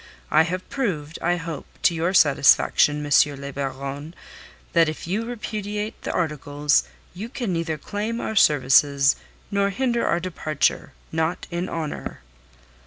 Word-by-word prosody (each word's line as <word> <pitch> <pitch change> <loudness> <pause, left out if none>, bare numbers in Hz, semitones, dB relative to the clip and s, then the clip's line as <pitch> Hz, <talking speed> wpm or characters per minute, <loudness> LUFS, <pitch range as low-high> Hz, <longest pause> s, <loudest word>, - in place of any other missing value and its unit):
I - - +6
have 180 +3 -2
proved, 170 - -3
I 175 +1 +2
hope, 165 -4 -6 0.2
to 175 - +4
your 165 +2 0
satisfaction, 145 -1 +4
M. 145 - -6 0.3
le 140 0 -7
Baron, 140 +3 -5 0.6
that 165 -2 +4
if 155 - -6
you 200 +7 -2
repudiate 210 -2 -4
the - - -3
articles 150 -3 +1 0.3
you 205 +6 -6
can 240 -7 -3
neither 165 -2 -2
claim 210 +9 -4
our 220 - -3
services 140 -3 +4 0.4
nor 200 0 +2
hinder 235 +3 0
our 170 - +1
departure 160 -4 -1 0.2
not 160 +2 -1
in 175 +2 -3
honour." 160 -3 -5
165 Hz, 140 wpm, -23 LUFS, 145-200 Hz, 0.6 s, I